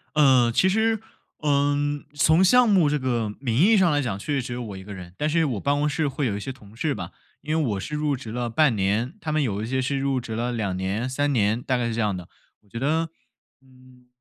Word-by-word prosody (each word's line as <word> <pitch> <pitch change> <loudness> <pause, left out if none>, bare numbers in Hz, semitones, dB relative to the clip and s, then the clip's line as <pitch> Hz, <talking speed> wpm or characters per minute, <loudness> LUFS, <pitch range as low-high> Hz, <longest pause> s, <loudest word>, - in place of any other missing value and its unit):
呃， 130 -5 +5
其 190 - +3
实， 220 +2 +2 0.4
嗯 145 0 +1
从 160 +5 +4
项 250 +5 +6
目 185 -8 +4
这 150 - +1
个 120 -5 -1
名 120 -5 -2
义 210 +7 +5
上 180 -4 +4
来 145 0 +2
讲， 110 -7 -2
确 145 +8 -4
实 135 - +1
只 120 0 -6
有 125 - -4
我 100 -4 -7
一 95 - -9
个 105 +1 -9
人， 90 -1 -10
但 150 +1 0
是 165 0 +2
我 120 -8 -2
办 140 +6 +1
公 150 +1 +1
室 150 0 0
会 140 +1 -2
有 105 -5 -1
一 - - -4
些 135 - -5
同 110 -5 -15
事 145 +4 -1
吧， - - -6 0.3
因 155 +1 -2
为 155 -5 +1
我 100 - -2
是 150 +9 -5
入 150 -2 0
职 115 -4 -8
了 120 0 -2
半 135 0 +3
年， 105 - 0
他 155 - -3
们 155 0 +1
有 105 -4 -2
一 - - -4
些 130 +1 0
是 135 +2 -1
入 135 -1 0
职 115 -2 -7
了 120 +2 -1
2 105 -6 -2
年 100 +7 -2
3 145 +2 0
年， 110 +1 +1
大 130 -1 0
概 120 -1 -1
是 115 - -2
这 115 - 0
样 105 -3 0
的， 90 - -9 0.3
我 105 - -29
觉 115 - -6
得， 160 +4 0 0.5
嗯， 130 -1 -21
130 Hz, 275 characters per minute, -24 LUFS, 115-150 Hz, 0.5 s, 项